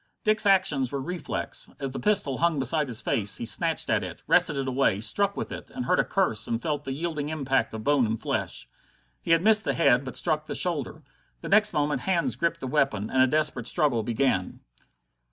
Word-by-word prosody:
Dick's 215 -2 +3
actions 155 -10 +3
were 140 - -3
reflex. 175 +6 -3
As 135 -1 -3
the - - -6
pistol 200 -11 +1
hung 170 -2 +1
beside 140 +3 0
his 120 -1 -2
face, 100 -3 +1
he - - -5
snatched - - +2
at - - +1
it, - - -8
wrested 150 - +2
it 135 -1 -2
away, 130 -6 +1
struck 200 - 0
with - - -5
it, - - -8
and 250 0 -6
heard 180 - +1
a - - +4
curse 110 - 0
and 115 - -2
felt 145 0 -3
the 135 - -4
yielding 150 0 -4
impact 135 -6 -1
of 110 - -7
bone 140 -2 +2
and 110 +1 -3
flesh. - - -3 0.5
He - - -9
had 165 +1 +4
missed 215 0 +6
the - - -1
head 125 -6 +3
but 130 - -5
struck 155 -2 -1
the - - -4
shoulder. 155 -3 -2 0.4
Next 210 +1 +3
moment 150 0 -1
hands 175 -3 0
gripped 170 0 -2
the - - -4
weapon, 130 -7 -1
and 130 - +2
a 130 - +5
desperate 150 -4 -1
struggle 145 -9 +1
began. 110 -4 -1
145 Hz, 210 wpm, -26 LUFS, 130-170 Hz, 0.5 s, missed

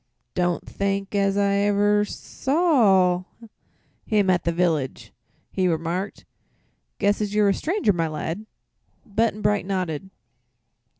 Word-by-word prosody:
"Don't 175 -1 0
think 200 0 -2
as 200 -1 +1
ever 205 +1 +2
I - - 0
sawr 210 - +2 0.8
him 205 -3 +3
at 175 - 0
the 170 - +2
village," 165 -6 -1 0.4
he 185 -1 +1
remarked. 170 +4 -2 0.7
"Guess 205 +1 +1
as 210 -1 -2
you're 210 -1 +4
a - - +3
stranger, 330 - 0
my 165 -2 0
lad." 165 +6 -5 0.6
Button 220 0 -1
Bright 205 -2 +1
nodded. 185 -3 -3
200 Hz, 120 wpm, -24 LUFS, 180-210 Hz, 0.8 s, you're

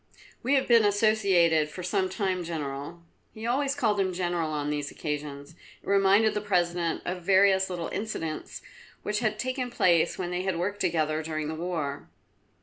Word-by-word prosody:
"We 270 +3 +2
have 270 - +1
been 235 -2 +6
associated 200 -7 +3
for 180 +4 -8
some 185 +1 0
time, 185 -2 -1
General." 155 0 -5 0.3
He 220 +1 -7
always 275 +3 0
called 220 -7 +1
him 190 -1 +1
General 175 -3 -1
on 150 -1 -2
these 145 -1 -2
occasions, 145 -1 -5
it 165 - -21
reminded 200 +2 +4
the 210 - -2
President 175 -4 0
of 180 0 -3
various 190 +1 +4
little 175 -2 -4
incidents 165 -8 -5 0.4
which 210 0 -1
had 215 -2 0
taken 255 +2 -2
place 175 -7 +2
when 180 -1 -3
they 180 0 -1
had 190 -2 -1
worked 200 +4 -2
together 155 -4 0
during 155 -1 -3
the - - -3
war. 160 -4 -4
180 Hz, 170 wpm, -27 LUFS, 160-205 Hz, 0.4 s, been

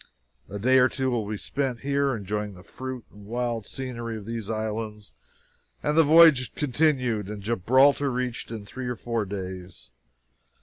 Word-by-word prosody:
A 100 - -5
day 130 +5 +4
or 130 0 +5
two 130 0 -1
will 115 -4 -1
be 105 - -3
spent 130 +1 -2
here, 140 -1 +1
enjoying 105 -1 -4
the 90 - -13
fruit 130 +3 -7
and 100 0 -14
wild 120 -2 -2
scenery 120 -4 -5
of 105 - -9
these 115 -2 -5
islands, 110 -1 -4 0.7
and 150 - +1
the 165 - +7
voyage 155 -4 +6
continued, 130 -8 +1
and 105 -1 -6
Gibraltar 130 +7 +3
reached 125 -1 -3
in 110 -3 -6
three 130 +5 -6
or 125 - -2
four 115 -2 -2
days. 95 -4 -7
115 Hz, 165 wpm, -26 LUFS, 105-130 Hz, 0.7 s, the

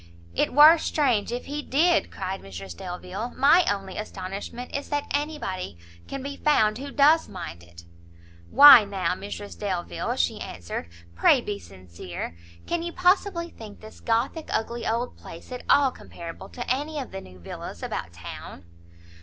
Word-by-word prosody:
"It - - +1
were 305 +4 +8
strange 250 -10 +1
if 245 +1 -4
he 295 +2 -4
did!" 325 +5 +2
cried 190 0 -5
Mrs 95 -1 -8
Delvile; 185 - -6
"my 305 +7 +6
only 195 -2 -3
astonishment 200 +4 -6
is 280 - -4
that 290 -1 -1
anybody 285 - -3 0.3
can 275 -1 -5
be 280 0 -5
found 220 -7 +3
who 280 +1 -6
does 300 +3 +4
mind 85 - -7
it." 85 0 -15 0.7
"Why 280 -5 +10
now, 195 -2 -1
Mrs 200 +2 -7
Delvile," 185 -4 -2
she 85 -1 0
answered, 85 0 -6 0.2
"pray 90 - +5
be 205 -4 -4
sincere; 90 - -8 0.3
can 345 0 -1
you 345 0 -4
possibly 360 -1 +2
think 215 -2 -11
this 215 0 -13
Gothic 240 +8 -1
ugly 235 +1 -2
old 235 +2 -2
place 165 - -11
at 250 - -5
all 275 -2 +5
comparable 170 -8 -10
to 245 - -7
any 295 +4 -1
of 270 -4 -5
the 195 - -6
new 90 - -14
villas 85 - -8
about 85 - -4
town?" 85 +1 -9
220 Hz, 160 wpm, -26 LUFS, 180-285 Hz, 0.7 s, Why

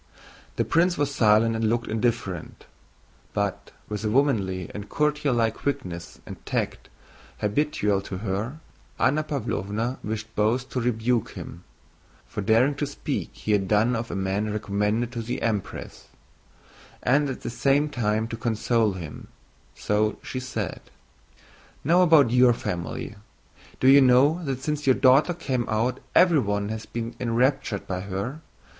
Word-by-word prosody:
The - - 0
prince 175 +2 +2
was 145 -1 0
silent 115 -1 +4
and 110 -1 +1
looked 120 +1 0
indifferent. 110 -6 -2 0.7
But, - - -2 0.2
with 105 -1 -4
the 110 - -1
womanly 105 - +1
and 105 0 -7
courtierlike 145 -7 +1
quickness 90 -13 -4
and - - -10
tact - - -3 0.5
habitual 105 -3 +1
to 95 - -5
her, 105 +8 -3 0.4
Anna 150 +4 +2
Pávlovna 115 -4 -3
wished 110 +1 -5
both 115 +5 +1
to 125 - -1
rebuke 120 -1 0
him 85 - -9 0.6
(for - - -5
daring 115 +7 +3
to 145 - -1
speak 145 - -4
as - - -15
he 110 - 0
had 100 -2 +2
done 110 +5 +3
of 115 +1 -3
a - - -4
man 95 +2 -1
recommended 105 +3 -1
to 120 -2 -4
the 115 +2 -3
Empress) 105 -4 -3 1.0
and 140 +3 +3
at 130 - -5
the - - -4
same 140 +4 +2
time 110 -5 -1
to 115 - -4
console 115 -2 +1
him, 85 -5 -8 0.5
so 105 +1 0
she 130 - -4
said: 125 -6 -4 1.0
"Now 170 +5 +4
about 160 -9 +6
your 125 0 +6
family. 90 0 -5 0.6
Do 130 - +3
you 140 +1 +8
know 135 +7 +4
that 135 -2 -3
since 150 -2 -2
your 130 - +6
daughter 140 +6 +4
came 130 -7 -2
out 115 +4 0 0.2
everyone 105 - +3
has 110 0 -5
been 115 0 -4
enraptured 120 -3 0
by 90 -1 -3
her? 100 +10 -4
115 Hz, 150 wpm, -25 LUFS, 105-135 Hz, 1.0 s, you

